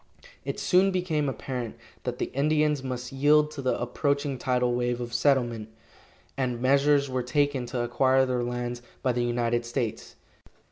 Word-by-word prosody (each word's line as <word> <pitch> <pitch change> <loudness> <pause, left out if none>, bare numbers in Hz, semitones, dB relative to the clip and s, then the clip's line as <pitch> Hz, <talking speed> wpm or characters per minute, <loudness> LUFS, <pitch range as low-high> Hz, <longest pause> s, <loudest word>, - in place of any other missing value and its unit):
It - - -4
soon 185 +1 +4
became 170 -6 0
apparent 125 -1 -5 0.3
that - - -2
the - - -3
Indians 150 +1 +2
must 125 -2 -5
yield 150 +2 +4
to 150 -2 -6
the 130 - 0
approaching 140 +2 -1
tidal 125 -2 +1
wave 120 0 0
of 120 -1 -5
settlement, 120 -4 +1 0.7
and 125 -3 -1
measures 140 +2 +3
were 130 -1 -1
taken 135 0 0
to 125 0 -2
acquire 130 +2 +3
their 125 -1 -1
lands 120 0 -3 0.2
by 130 - +2
the 120 0 0
United 120 0 0
States. 120 -1 -4
130 Hz, 155 wpm, -27 LUFS, 120-140 Hz, 0.7 s, soon